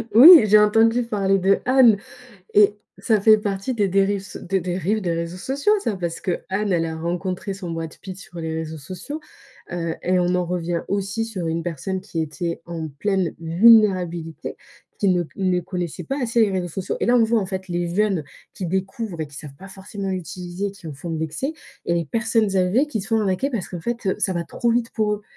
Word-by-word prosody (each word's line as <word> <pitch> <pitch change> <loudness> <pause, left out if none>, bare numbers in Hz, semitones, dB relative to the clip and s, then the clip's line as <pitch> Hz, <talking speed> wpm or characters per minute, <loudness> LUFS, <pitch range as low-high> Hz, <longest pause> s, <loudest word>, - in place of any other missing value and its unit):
Oui, 320 +8 +11
j'ai 210 0 +6
entendu 225 +3 +4
parler 195 -4 +1
d'Anne, 225 +4 +4 0.6
et 205 0 +5 0.2
ça 220 -3 +2
fait 215 +1 +6
partie 205 +4 -2
des 205 -3 +1
dérives 195 +1 +1
so - - -9
des 190 +1 -1
dérives 185 +4 -1
des 175 -4 -1
réseaux 170 +1 -3
sociaux, 280 - 0
ça 220 -4 -1
Parce 170 -2 -4
qu'Anne, 190 +3 -2
elle 165 -2 +1
a 160 - -4
rencontré 180 +4 -3
son 185 -3 -7
Brad 165 -1 -5
Pitt 185 -1 -7
sur 175 -2 -11
les 160 -1 -3
réseaux 160 0 -5
sociaux, 185 - -7 0.5
heu, 165 -2 -2
et 180 +1 +2
on 180 0 +1
en 180 -1 +1
revient 175 -1 -2
aussi 200 +3 -1
sur 195 -7 -5
une 165 +1 -1
personne 175 +3 -3
qui 165 - -4
était 170 +2 -4
en 165 -2 -5
pleine 185 +5 -1
vulnérabilité, 175 -3 +3 0.4
qui 200 - +2
ne 180 -1 +3
c 165 - -11
ne 185 -2 +1
connaissait 175 -2 -5
pas 275 0 -3
assez 235 -1 +1
les 210 - +3
réseaux 180 -2 -2
sociaux. 185 +3 -4
Et - - +1
là, 245 - +4
on 230 - +5
voit, 225 0 +2
en 195 - -3
fait, 190 0 -5
les 175 0 -2
jeunes 200 -4 +1 0.3
qui 185 - -4
découvrent 190 +1 -3
et - - -5
qui 145 - -16
savent 140 -2 -9
pas 195 - -11
forcément 195 0 -6
utiliser, 180 +1 -4
qui 195 -4 -13
en 155 - -5
font 145 +5 -8
de 160 - -2
l'excès, 160 - -3 0.3
et 170 - +1
les 170 -1 0
personnes 225 +2 0
âgées 190 +11 +3
qui 225 -8 -3
se 195 - -8
font 225 -1 +2
arnaquer 200 +6 0
parce 225 -8 -3
qu'en 175 -3 -6
fait, 235 +3 -4
eux, 190 - +1
ça 190 -3 0
va 170 -1 -2
trop 235 - -1
vite 230 0 0
pour 210 -2 0
eux. 210 - -9
190 Hz, 220 wpm, -22 LUFS, 170-215 Hz, 0.6 s, Oui